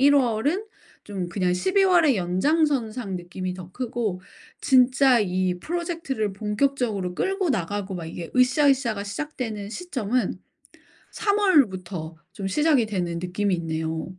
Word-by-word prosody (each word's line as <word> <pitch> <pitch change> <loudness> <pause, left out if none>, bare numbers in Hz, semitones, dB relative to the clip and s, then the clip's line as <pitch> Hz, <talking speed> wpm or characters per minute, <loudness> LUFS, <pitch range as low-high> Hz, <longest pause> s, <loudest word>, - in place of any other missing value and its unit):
1 285 +2 +6
월은 275 - +1 0.4
좀 190 -4 -4
그냥 180 0 0
12 375 - +2
월의 335 -8 +4
연장선상 225 - 0
느낌이 180 +1 -5
더 185 -1 -10
크고 230 -7 -3 0.4
진짜 255 -1 +5
이 185 -2 0
프로젝트를 330 - -3
본격적으로 210 -2 -1
끌고 385 - 0
나가고 195 -2 -2
막 170 -3 -5
이게 165 0 -7
으쌰으쌰가 255 -4 +3
시작되는 220 -3 -5
시점은 255 - -2 0.7
3 410 -1 +1
월부터 185 - +1 0.2
좀 195 0 -4
시작이 290 +1 +3
되는 175 -5 -2
느낌이 190 +2 0
있네요. 160 +2 -3
215 Hz, 275 characters per minute, -24 LUFS, 185-280 Hz, 0.7 s, 1